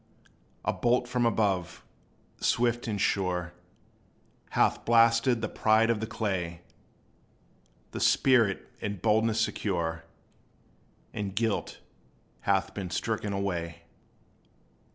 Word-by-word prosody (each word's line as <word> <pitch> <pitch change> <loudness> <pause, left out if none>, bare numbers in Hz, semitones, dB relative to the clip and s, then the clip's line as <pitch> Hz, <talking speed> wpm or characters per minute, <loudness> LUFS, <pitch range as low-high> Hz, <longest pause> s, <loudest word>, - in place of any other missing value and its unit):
A - - +1
bolt 120 0 +1
from 120 -1 +1
above, 100 -6 -1 0.5
swift 120 0 +1
and 105 -2 -2
sure, 90 -3 0 1.0
Hath - - +3
blasted 115 +1 +4
the 110 - -1
pride 110 +2 +3
of 115 - -1
the 110 - -3
clay; 90 -7 -3 1.3
The - - -5
spirit, 115 -7 +3
in 105 0 -3
boldness 110 +3 +2
secure, 85 -7 -1 1.1
In 105 -1 -3
guilt 110 +1 -2 0.7
hath 95 -1 +2
been 95 -3 -5
stricken 105 +4 -2
away. 90 -4 -3
105 Hz, 100 wpm, -28 LUFS, 95-115 Hz, 1.3 s, blasted